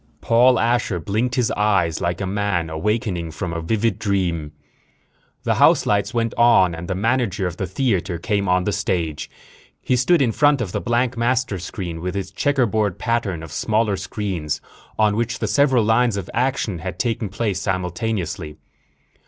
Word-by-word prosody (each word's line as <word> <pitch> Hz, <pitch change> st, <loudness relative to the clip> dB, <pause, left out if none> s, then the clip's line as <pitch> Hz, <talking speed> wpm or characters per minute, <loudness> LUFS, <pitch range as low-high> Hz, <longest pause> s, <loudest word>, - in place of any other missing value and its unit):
_ -, -, -41 dB
Paul 125 Hz, +2 st, +4 dB
Asher 115 Hz, -5 st, +1 dB
blinked 110 Hz, +8 st, -1 dB
his 125 Hz, -3 st, +1 dB
eyes, 100 Hz, -6 st, +1 dB
like 85 Hz, +2 st, -1 dB
a -, -, -1 dB
man 95 Hz, -4 st, -1 dB
awakening 90 Hz, 0 st, -1 dB
from 85 Hz, +2 st, -5 dB
a 85 Hz, -, -3 dB
vivid 110 Hz, +4 st, 0 dB
dream. 90 Hz, -7 st, -1 dB, 0.9 s
The -, -, +1 dB
house -, -, +5 dB
lights 100 Hz, -1 st, +1 dB
went 115 Hz, -2 st, -1 dB
on 115 Hz, -7 st, +5 dB
and 85 Hz, +1 st, -6 dB
the 95 Hz, -, -2 dB
manager 110 Hz, -2 st, 0 dB
of 90 Hz, -1 st, -4 dB
the 95 Hz, -, -3 dB
theater 95 Hz, -4 st, -1 dB
came 100 Hz, +2 st, -1 dB
on 90 Hz, 0 st, +3 dB
the 105 Hz, -, 0 dB
stage. 90 Hz, -6 st, -2 dB, 0.5 s
He 130 Hz, -, 0 dB
stood 150 Hz, +8 st, +3 dB
in 130 Hz, -5 st, +2 dB
front 145 Hz, +4 st, +3 dB
of 110 Hz, -7 st, -3 dB
the -, -, -2 dB
blank 120 Hz, +1 st, 0 dB
master 120 Hz, -4 st, 0 dB
screen 85 Hz, -2 st, -6 dB
with 90 Hz, +2 st, -3 dB
its 95 Hz, -1 st, -4 dB
checkerboard 110 Hz, -5 st, +1 dB
pattern 115 Hz, -9 st, -1 dB
of 80 Hz, -, -9 dB
smaller 110 Hz, +3 st, +1 dB
screens, 95 Hz, -6 st, -3 dB, 0.4 s
on 105 Hz, -1 st, +3 dB
which 115 Hz, +1 st, -1 dB
the -, -, -2 dB
several 135 Hz, -5 st, +3 dB
lines 110 Hz, 0 st, +2 dB
of 95 Hz, -, -5 dB
action 120 Hz, -7 st, -1 dB
had 95 Hz, +3 st, -5 dB
taken 115 Hz, -3 st, -1 dB
place 100 Hz, -1 st, -2 dB
simultaneously. 95 Hz, -4 st, -3 dB
100 Hz, 175 wpm, -21 LUFS, 90-115 Hz, 0.9 s, house